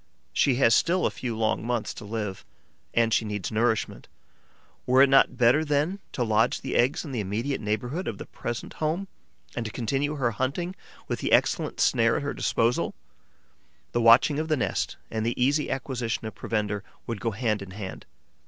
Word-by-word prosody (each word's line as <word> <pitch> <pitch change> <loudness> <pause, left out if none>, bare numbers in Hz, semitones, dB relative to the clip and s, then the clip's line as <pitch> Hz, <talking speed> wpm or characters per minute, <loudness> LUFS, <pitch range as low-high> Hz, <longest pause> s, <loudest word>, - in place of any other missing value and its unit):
She 135 - +3
has 120 -3 +4
still 180 +2 +3
a - - +2
few 120 -3 -4
long 110 -3 0
months 120 -1 -2
to 110 - -9
live 105 -3 -4 0.5
and 115 -1 +2
she - - +3
needs 105 -3 -4
nourishment. 110 0 0 0.8
Were 130 +2 +6
it 140 - +4
not 135 -2 +5
better, 125 +5 +4
then, 150 +6 0
to 125 - 0
lodge 110 +1 +2
the 135 - -4
eggs 130 +7 +2
in 145 - -6
the 125 - -2
immediate 110 +8 -2
neighbourhood 120 - -2
of 105 - -3
the - - -7
present 120 -1 -5
home 165 +6 0 0.5
and 120 - -2
to 110 - -5
continue 135 +7 -1
her 125 -5 0
hunting 140 - -2 0.3
with - - -2
the - - -2
excellent - - +2
snare - - +3
at - - -1
her - - -2
disposal? 115 +2 0 1.0
The 120 - 0
watching 115 +6 +6
of 155 - -2
the 155 -1 +1
nest - - -1
and 110 -1 -1
the 115 +2 -2
easy 140 +4 +2
acquisition 125 -4 -3
of 110 - -5
provender 105 -2 -2 0.2
would 115 -3 -4
go 115 - 0
hand 110 -1 -1
in 100 - -8
hand. 95 0 -7
120 Hz, 190 wpm, -26 LUFS, 110-135 Hz, 1.0 s, Were